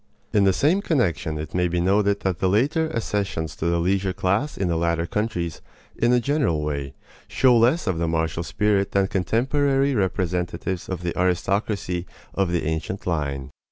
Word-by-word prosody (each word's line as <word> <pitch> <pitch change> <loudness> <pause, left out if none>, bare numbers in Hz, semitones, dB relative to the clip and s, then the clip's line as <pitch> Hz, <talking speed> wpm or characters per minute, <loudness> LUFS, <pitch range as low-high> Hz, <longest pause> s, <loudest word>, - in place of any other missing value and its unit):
In 100 -2 +4
the 95 - +5
same 155 - +2
connection 90 - 0
it 75 +1 -6
may 90 0 +2
be 85 0 -1
noted 100 +3 +2
that 95 -2 -1
the 95 -1 +2
later 145 - +1
accessions 100 -8 -2
to 85 - -1
the 85 0 +2
leisure 95 +2 +1
class 100 +12 0
in 95 - 0
the 85 - 0
latter 85 0 0
countries, 85 -5 -2 0.3
in 120 - +2
a 125 - +4
general 130 - 0
way, 70 -2 -3 0.3
show 130 -2 +4
less 120 +8 +3
of 95 -5 -1
the 85 - 0
martial 80 0 -1
spirit 100 +2 0
than 100 -1 +3
contemporary 135 - +1
representatives 90 -3 -2
of 90 -2 -4
the 85 - -2
aristocracy 90 0 -1 0.3
of 95 -3 0
the 85 -3 0
ancient 80 +5 -3
line. 75 -5 -2
95 Hz, 175 wpm, -23 LUFS, 85-110 Hz, 0.3 s, the